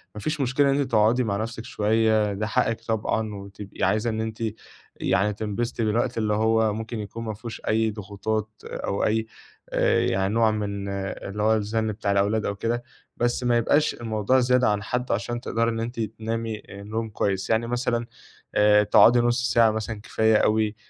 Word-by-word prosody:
ما 105 - -6
فيش 155 +2 -2
مشكلة 135 +2 +2
إن - - +2
أنتِ 135 -2 -1
تقعدي 110 +4 +4
مع 100 -3 -1
نفسك 115 +1 -4
شوية، 110 -2 +2
ده 105 +2 -2
حقِّك 115 +1 0
طبعًا، 110 -1 -1
وتبقي 100 0 -8
عايزة 110 +2 +2
إن 110 0 -2
أنتِ 110 0 -4 0.5
يعني 105 +3 +1
تنبسطي 110 +2 -2
بالوقت، 115 +3 0
اللي 105 -1 +1
هو 110 0 +2
ممكن 110 +1 -5
يكون 105 +3 -6
ما 110 - -3
فيهوش 110 +2 -8
أي 110 0 +2
ضغوطات 105 +1 -3 0.2
أو 100 - -3
أي 110 +1 0 0.4
آآ، - - +2
يعني 95 +1 0
نوع 115 -1 +3
من 100 -2 -3
اللي 100 +1 -4
هو 110 +1 +4
الزن 110 +1 -1
بتاع 105 -1 -2
الأولاد 100 +2 +1
أو 100 - -2
كده. 120 +3 -2 0.3
بس 120 +1 0
ما 120 -1 +3
يبقاش 145 +6 +2
الموضوع 110 +2 +1
زيادة 125 -1 +3
عن 105 -1 0
حده 125 +3 -2
علشان 120 +3 -2
تقدري 115 -1 0
إن 115 -1 -3
أنتِ 115 +1 -4
تنامي 110 0 -4
نوم 110 +3 -5
كويس. 95 -2 -1
يعني 115 +1 +1
مثلًا 120 -1 -1 0.5
آآ، 105 0 +5
تقعدي 115 +3 +6
نص 120 +1 +1
ساعة 115 -2 +5
مثلًا 110 -1 -4
كفاية 110 0 +2
أوي، 110 0 +2
110 Hz, 180 wpm, -25 LUFS, 105-115 Hz, 0.5 s, تقعدي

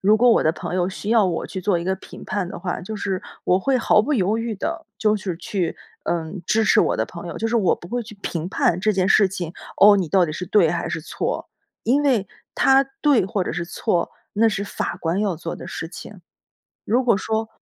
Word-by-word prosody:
如 210 +3 +5
果 245 +2 +5
我 - - +4
的 155 - +3
朋 175 - -5
友 180 0 +1
需 205 +3 -5
要 225 -3 +5
我 170 -2 -2
去 190 - -5
做 185 -2 +1
一 170 - -5
个 190 - +1
评 - - -12
判 195 -4 -2
的 - - -7
话， 175 0 -3
就 215 +4 -6
是 195 -2 -2 0.2
我 180 - +3
会 265 +4 +1
毫 210 -2 +4
不 295 - -1
犹 210 0 +1
豫 230 -1 -2
地 200 - -4
就 215 -1 +2
是 185 -4 -4
去， 185 -1 -2 0.3
嗯， 170 +2 -3
支 220 0 +2
持 - - +5
我 - - +1
的 - - 0
朋 - - -8
友， - - -6
就 225 - -1
是 235 - +1
我 195 -6 +3
不 175 - -12
会 245 +1 -2
去 215 -2 -12
评 170 +1 -3
判 180 -1 +1
这 215 +2 +2
件 190 -1 +1
事 200 -1 +5
情， 175 -3 -5 0.2
哦， 205 0 +8
你 180 -5 -1
到 185 0 +4
底 155 - -4
是 180 +3 -5
对 175 -6 +4
还 175 -1 -2
是 - - -3
错。 155 - -3 0.4
因 275 +5 +3
为 235 -9 +2 0.3
它 270 +1 +5 0.2
对 285 - +4
或 200 -3 -1
者 - - -3
是 175 - -3
错， 175 0 -1 0.2
那 225 +2 +4
是 200 -1 -2
法 175 - -3
官 170 +4 0
要 200 -4 0
做 170 +1 -5
的 - - -9
事 165 - -5
情。 195 +1 -10 0.6
如 245 +4 +2
果 235 -5 +3
说 220 +1 -2
195 Hz, 260 characters per minute, -22 LUFS, 175-220 Hz, 0.6 s, 哦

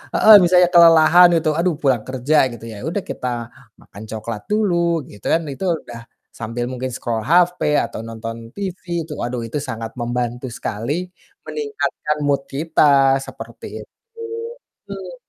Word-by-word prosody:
heeh, 220 - +8
misalnya 180 0 +5
kelelahan 170 +1 +7
itu 155 -1 0
aduh 175 -1 +1
pulang 130 -6 +1
kerja 130 +4 0
gitu, 115 -1 -10
ya - - -9
udah 195 +3 -3
kita 125 - -5 0.5
makan 100 - -12
coklat 110 0 -5
dulu 170 -6 +1
gitu 105 - -16
kan, 165 - +2
itu 190 - -5
udah 120 -1 -10 0.4
sambil 115 +1 -4
mungkin 130 0 -4
scroll 115 -3 -3
HP 180 +2 +3 0.3
atau - - -8
nonton 115 0 -7
TV, 190 -3 -5 0.3
itu 155 - -12
aduh 120 0 -4
itu 115 - -4
sangat 115 -4 -5
membantu 120 +1 -3
sekali 115 +3 -4 0.5
meningkatkan 425 - -3
mood 140 -1 +1
kita, 140 -2 +3
seperti - - -10 0.2
itu, - - -25 0.9
betul. - - -8
140 Hz, 145 wpm, -20 LUFS, 120-170 Hz, 0.9 s, heeh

